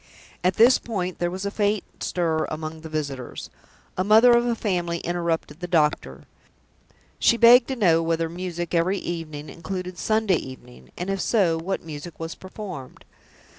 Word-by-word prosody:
At 180 +1 +2
this 240 +3 +6
point 185 -6 -4
there 175 - 0
was 185 +2 -5
a 200 - -2
faint 205 -1 0 0.2
stir 160 -3 0
among 155 0 -6
the 160 - -8
visitors. 140 -5 -5 0.5
A - - +3
mother 220 +4 +6
of 240 0 +2
a 235 - +1
family 175 -6 -1
interrupted 170 -2 -2
the 180 - -5
doctor. 150 - 0 1.0
She 235 - +4
begged 235 +1 +7
to 265 - -2
know 170 -8 +3
whether 165 0 0
music 175 0 -5
"every 175 +4 +2
evening" 155 -5 -5
included 180 +2 -6
Sunday 215 -4 +2
evening; 65 - -11
and, 180 +2 -3
if 195 -1 -2
so, 190 -8 +2
what 185 +1 -3
music 160 +1 -8
was 165 0 -4
performed? 185 -8 -9
175 Hz, 165 wpm, -24 LUFS, 160-200 Hz, 1.0 s, begged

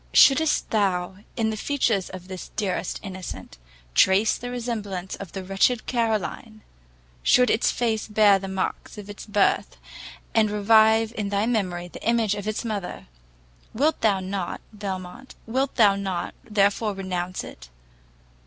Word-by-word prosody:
Should'st 300 +3 +5
thou, 190 -3 0 0.2
in 220 -2 +1
the - - -3
features 225 -5 0
of 185 -1 -9
this 185 -1 -8
deserted 195 -4 -2
innocent, 185 - -8 0.3
trace 195 - +4
the 245 - -6
resemblance 215 -7 -4
of 195 -4 -9
the 190 - -5
wretched 195 +5 +1
Caroline, 220 -2 -2 0.6
should 250 - +4
its 225 - +2
face 225 -3 -1
bear 210 -2 +5
the 195 - -6
marks 190 +3 -4
of 205 0 -8
its 205 - -10
birth, 205 -1 +1 0.6
and 220 -2 +3
revive 220 +2 +4
in 205 -2 -2
thy 200 +1 +1
memory 185 -7 -1
the - - -11
image 230 -3 +2
of 205 0 -5
its 215 +2 -2
mother, 205 -5 -4 0.7
wilt 295 +7 +1
thou 205 -3 +3
not, 190 -1 -4
Belmont, 200 +4 -7
wilt 260 +4 -1
thou 210 -5 +5
not 190 -3 -3
therefore 205 0 +1
renounce 185 -1 -3
it? - - -11
205 Hz, 145 wpm, -24 LUFS, 190-225 Hz, 0.7 s, Should'st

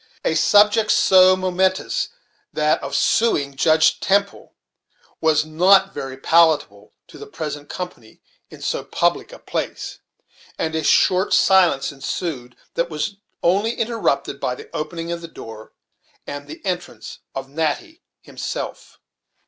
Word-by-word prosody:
A - - +2
subject 210 +1 +4
so 185 0 +6
momentous 185 - 0
as - - -16 0.4
that 150 0 +1
of 140 0 -5
suing 145 -9 +1
Judge 160 +3 +3
Temple 200 +1 -1 0.7
was 155 -1 +3
not 190 +5 +4
very 130 -1 -6
palatable 150 -10 +2
to - - -15
the - - -9
present 145 -2 -6
company 180 -12 -8 0.3
in - - -12
so - - -2
public - - -1
a - - -10
place; - - -5 0.6
and 160 - -2
a 160 0 -1
short 185 +1 +3
silence 185 -8 +3
ensued, 135 -2 -5 0.2
that 170 +1 -1
was 170 +6 -4 0.3
only 205 +7 +2
interrupted 230 0 -1
by - - -2
the 435 0 -13
opening 165 +2 -4
of 170 0 -4
the 170 - -8
door, 110 -8 -11 0.5
and 145 0 -7
the 155 +6 -11
entrance 180 -2 -5 0.2
of 135 0 -5
Natty 160 - -3 0.2
himself. - - -6
170 Hz, 135 wpm, -21 LUFS, 145-190 Hz, 0.7 s, so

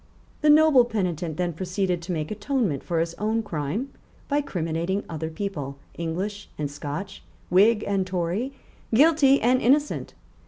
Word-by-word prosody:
The 305 - +4
noble 300 -4 +7
penitent 180 -8 -2
then 175 -1 -1
proceeded 180 +1 -1
to 175 +2 -5
make 155 -1 -3
atonement 210 - -1
for 170 -2 -1
his 165 0 -1
own 220 +2 0
crime 185 - -3 0.4
by 290 +1 +1
criminating 175 - -2
other 160 -1 -4
people, 160 -6 -5 0.2
English 190 +5 -4
and 145 -2 -3
Scotch, 150 +7 -6 0.3
Whig 210 +4 +5
and 195 -2 0
Tory, 185 +8 -1 0.4
guilty 280 +2 +5
and 255 +2 +3
innocent. 290 +4 +1
190 Hz, 145 wpm, -25 LUFS, 165-235 Hz, 0.4 s, noble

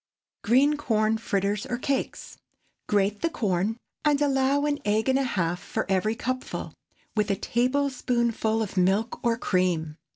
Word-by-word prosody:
GREEN 275 +7 +4
CORN 220 -5 +1
FRITTERS 200 -1 -1
OR 245 - -2
CAKES. 275 +2 -3 0.5
✠ - - -44
Grate 205 0 +1
the 335 - +1
corn, 205 - -1 0.3
and 295 -2 +3
allow 280 0 +2
an 290 -1 0
egg 215 +3 +1
and 265 +1 +3
a - - +1
half 180 -8 -1
for 220 - -3
every 195 +3 +1
cupful, 255 +3 -4 0.4
with 210 -1 +1
a 200 - +2
tablespoonful 240 -2 0
of 200 -2 -7
milk 195 +5 +1
or 235 -1 +2
cream. 175 -7 0
225 Hz, 155 wpm, -26 LUFS, 200-260 Hz, 0.5 s, GREEN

